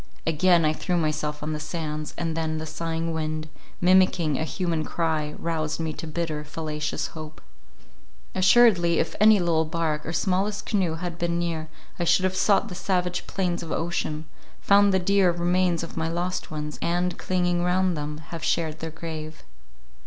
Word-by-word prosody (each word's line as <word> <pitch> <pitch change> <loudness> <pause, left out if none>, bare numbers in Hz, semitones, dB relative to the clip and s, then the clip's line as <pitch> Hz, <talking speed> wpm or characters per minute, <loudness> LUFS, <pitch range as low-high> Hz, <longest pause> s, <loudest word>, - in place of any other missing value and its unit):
Again 165 +1 +4
I 155 - +3
threw 180 +3 -1
myself 150 -2 -1
on 155 +1 -2
the 150 - -3
sands, 155 -1 -4
and 165 -2 -2
then 160 -1 -1
the 155 - -4
sighing 165 +1 -3
wind, 155 -1 -3 0.3
mimicking 180 -4 +4
a 155 - -1
human 165 -1 -1
cry, 155 -2 -1
roused 160 -2 -2
me 160 -1 -2
to 160 - -7
bitter, 155 -1 -3
fallacious 150 0 -3
hope. 155 -1 -9 0.9
Assuredly 185 -3 +5
if 160 - -1
any 215 +1 +7
little 170 -3 +2
bark 155 -1 -1
or 160 - -4
smallest 195 +3 0
canoe 185 -6 0
had 175 0 -5
been 170 0 0
near, 165 -2 -2 0.3
I - - +1
should 185 - +4
have 185 0 +1
sought 200 +3 +3
the 195 - -7
savage 180 -1 -1
plains 180 -3 -1
of 165 -2 -7
ocean, 160 -2 -2 0.3
found 200 0 +5
the 190 - +3
dear 190 0 +3
remains 175 0 +1
of 165 - -7
my 160 0 -1
lost 180 +3 -2
ones, 150 -2 -5
and 175 +1 0
clinging 175 -1 0
round 180 0 +2
them, 150 0 -4
have 165 -2 -6
shared 160 -1 0
their 165 - -4
grave. 160 -1 -7
165 Hz, 175 wpm, -25 LUFS, 155-180 Hz, 0.9 s, any